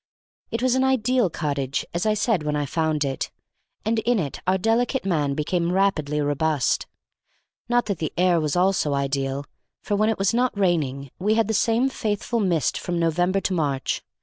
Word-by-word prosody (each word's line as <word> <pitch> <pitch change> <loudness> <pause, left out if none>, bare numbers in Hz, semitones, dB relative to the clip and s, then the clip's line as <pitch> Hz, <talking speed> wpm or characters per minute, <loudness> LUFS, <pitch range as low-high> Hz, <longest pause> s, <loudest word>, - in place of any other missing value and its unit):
It 230 - -3
was 255 -1 +3
an 260 0 +2
ideal 255 -4 +2
cottage, 140 -4 -2
as 175 +5 -1
I 215 - +3
said 210 -3 +1
when 150 0 -1
I 145 -1 0
found 155 0 0
it, 135 -1 -3 0.6
and 225 +1 +1
in 235 +2 +1
it 150 -8 -3
our 185 +1 +3
delicate 230 +4 +1
man 150 -7 0
became 170 +3 0
rapidly 165 -6 +1
robust. 145 -1 0 0.8
Not 240 0 +2
that 200 -5 -3
the 155 - -2
air 175 -2 +3
was 150 0 -1
also 180 -5 +2
ideal, 140 0 -1 0.4
for, 205 - -1
when 215 +2 +2
it 225 - 0
was 195 +1 +1
not 245 -2 +1
raining, 140 -8 0
we 210 +4 +2
had 225 -2 +2
the 220 - 0
same 230 +4 +2
faithful 225 -2 -2
mist 175 -7 +1
from 175 -1 -3
November 175 +3 +1
to 190 - -1
March. 145 -6 -1
180 Hz, 185 wpm, -24 LUFS, 150-220 Hz, 0.8 s, was